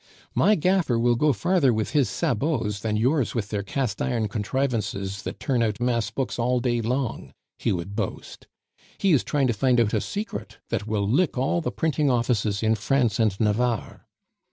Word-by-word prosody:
"My 215 - +4
gaffer 180 - +2
will 120 +1 +3
go 150 +5 +3
farther 140 - +2
with 110 -2 -1
his 140 -8 +2
'sabots' 120 - -1
than 105 0 -1
yours 130 +3 +1
with 110 -3 -2
their 105 -2 -2
cast 105 +1 -2
iron 115 -4 0
contrivances 105 -3 -2
that - - -6
turn 130 -5 0
out 110 -2 0
mass 120 -2 0
books 130 -2 -3
all 125 +1 +2
day 120 -1 0
long," 125 +2 -2 0.3
he - - 0
would 95 +2 -3
boast. - - -5 0.5
"He 195 - +2
is 135 - +3
trying 145 -3 +1
to 120 - +2
find 125 +3 +2
out 110 -3 +2
a - - +2
secret 210 +2 -5
that 105 - -2
will 105 -2 0
lick 140 - +1
all 135 +7 +1
the - - -2
printing 150 -2 0
offices 115 -4 0
in 110 0 +3
France 120 -1 +1
and 110 -4 +1
Navarre." 115 +1 -1
120 Hz, 185 wpm, -25 LUFS, 105-135 Hz, 0.5 s, My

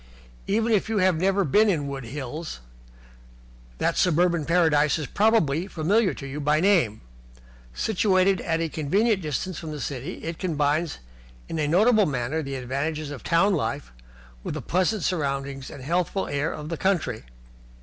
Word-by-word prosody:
Even 225 +3 +1
if 215 0 +2
you 220 - 0
have 185 -4 +2
never 195 +1 +2
been 210 +8 +4
in 150 -7 0
Wood 135 -2 -5
Hills, 145 - -6 1.2
that - - 0
suburban 175 -2 +2
paradise 160 -3 +3
is 155 - -3
probably 185 - +2
familiar 195 +6 +1
to 140 - -8
you 135 +2 -5
by 150 +1 +2
name. 170 - +2 0.7
Situated 190 -2 +2
at 165 -2 -1
a 165 - 0
convenient 190 +8 +1
distance 160 +3 -3
from 160 - -7
the 150 -1 -5
city, 140 +5 -5
it 165 0 -5
combines 155 -2 0 0.5
in 165 - -4
a 150 - +1
notable 210 +6 +4
manner 135 +3 -2
the 140 -2 -5
advantages 140 +4 -3
of 145 - -7
town 195 +5 +3
life 145 -4 -2 0.5
with - - -4
the - - -4
pleasant 185 +2 0
surroundings 140 -5 -2
and 140 -3 -10
healthful 175 +5 0
air 145 +2 -1
of 150 0 -7
the 165 - -3
country. 155 - 0
160 Hz, 160 wpm, -25 LUFS, 145-185 Hz, 1.2 s, been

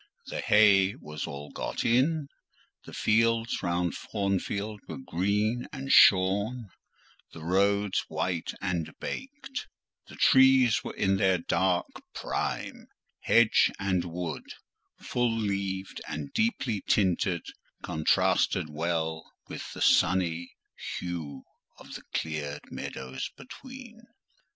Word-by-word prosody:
The - - -4
hay 100 -2 +5
was 75 -1 -6
all 70 +1 -8
got - - -4
in; 140 +6 +2 0.6
the - - -10
fields 115 +1 +1
round 85 -1 0
Thornfield 100 +1 -2
were - - -6
green 105 +1 -1
and 135 -1 -5
shorn; 100 +5 +5 0.6
the 80 - -10
roads 100 +3 +2
white 90 -3 -2
and 85 -5 -2
baked; 270 -1 -6 0.4
the - - -12
trees 130 -3 +5
were - - -6
in 95 -1 +2
their 95 -1 +3
dark 90 +1 +1 0.3
prime; - - -3 0.3
hedge 115 -2 +4
and 95 -3 0
wood, 85 -1 -5 0.5
full 120 -2 0
leaved 100 -3 -3
and 75 -2 -5
deeply 130 - 0
tinted, 90 -3 +2 0.4
contrasted 75 0 +1
well 80 0 -2 0.2
with - - -7
the - - -2
sunny 85 -2 +2 0.4
hue 80 -6 -5 0.3
of - - -12
the - - -7
cleared 75 -2 -4
meadows 65 0 -5
between. 240 - -11
95 Hz, 110 wpm, -28 LUFS, 85-115 Hz, 0.6 s, hay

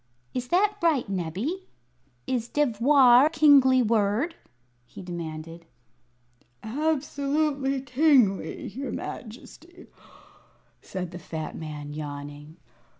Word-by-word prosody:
"Is 250 -1 -3
that 410 +7 +2
right, 315 -9 +2
Nebbie? 200 - -4 0.6
Is 245 -3 -2
'devoir' 260 0 +5
a - - -1
kingly 280 -5 +5
word?" 225 - +1 0.5
he 125 +9 -12
demanded. 165 -1 -7 1.0
"Absolutely 280 +1 -1
kingly, 255 -6 +2
your 265 +7 -6
Majesty," 305 +9 -9 1.0
said 180 -2 -6
the 175 - -8
fat 160 -2 -6
man, 150 -2 -7
yawning. 145 +1 -8
245 Hz, 90 wpm, -26 LUFS, -, 1.0 s, devoir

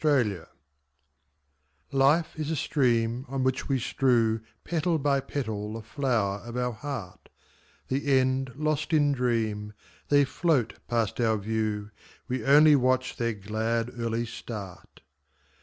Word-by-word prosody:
Petals 120 - +2 1.4
Life 140 +4 +3
is 155 -1 -3
a 160 - 0
stream 120 -4 +1
On 135 -1 -1
which 130 +2 -1
we 135 - +2
strew 115 -3 +2 0.2
Petal 165 0 0
by 140 -1 +2
petal 110 -7 -4
the 115 0 -6
flower 115 -6 0
of 120 +1 -6
our 125 0 0
heart; 115 -5 -7 0.6
The 135 +1 +2
end 130 0 +1
lost 155 +2 -1
in 145 -2 +4
dream, 110 -5 -1 0.4
They 145 -1 +5
float 150 -5 +1
past 115 -1 0
our 110 -2 +2
view, 105 0 -2 0.4
We 130 0 -2
only 150 +2 +7
watch 130 -1 +1
their 115 -1 0
glad, 110 +3 -2
early 115 0 -1
start. 105 -5 -9
125 Hz, 130 wpm, -27 LUFS, 110-140 Hz, 1.4 s, only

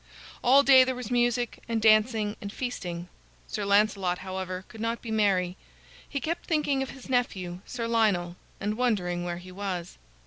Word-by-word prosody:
All 270 +3 +6
day 265 -2 +8
there 255 0 -1
was 250 -2 -6
music 240 -1 +1
and 230 -1 +1
dancing 215 -1 +3
and 200 - -5
feasting. 180 -9 -4 0.4
Sir 205 - -4
Lancelot, 200 -3 +2
however, 185 0 -5
could 225 -2 -11
not 230 +1 -1
be 230 - -7
merry. 190 -4 +1 0.5
He 280 - -2
kept 335 +4 -3
thinking 290 -4 +1
of 270 - -3
his 265 - -11
nephew, 190 -9 -1
Sir 235 -2 -3
Lionel, 205 -7 +1 0.2
and 210 +2 -2
wondering 180 -8 0
where 175 -1 -3
he 180 +1 -11
was. 185 -2 -5
215 Hz, 170 wpm, -28 LUFS, 185-245 Hz, 0.5 s, day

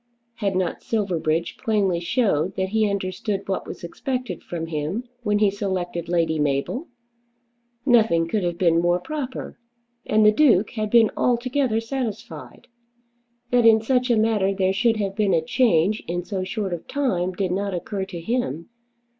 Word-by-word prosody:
Had 200 -3 -1
not 185 -2 -1
Silverbridge 170 -6 -1
plainly 200 -6 +1
shown 185 - +1
that 190 0 0
he 215 0 +2
understood 195 +1 -3
what 195 - -2
was - - -8
expected 250 - -4
from 165 -2 -4
him 165 +8 -3 0.2
when 210 -3 +1
he 205 -1 +3
selected 185 -4 -3
Lady 165 -2 +1
Mabel? 145 - -1 1.0
Nothing 220 -10 +4
could 205 +3 -1
have 175 -1 -1
been 170 -2 +3
more 175 +1 +2
proper, 265 +2 -6 0.5
and 215 0 +4
the 210 - +8
Duke 220 -6 +4
had 215 -2 -3
been 225 -1 +5
altogether 245 -1 +1
satisfied. 225 - -6 0.9
That 245 -2 +5
in 220 -1 +7
such 250 +3 +1
a 235 - +4
matter 210 -3 +2
there 190 -1 +1
should 225 +2 +2
have 195 -2 -2
been 200 -4 +2
a 165 - +2
change 210 -3 +2
in 175 +1 -2
so 190 -2 -3
short 190 0 -3
a 175 - -3
time 185 - -1
did 185 0 -2
not 200 +1 -1
occur 190 +2 -3
to 180 -3 -7
him. 170 - -2
195 Hz, 165 wpm, -23 LUFS, 175-225 Hz, 1.0 s, the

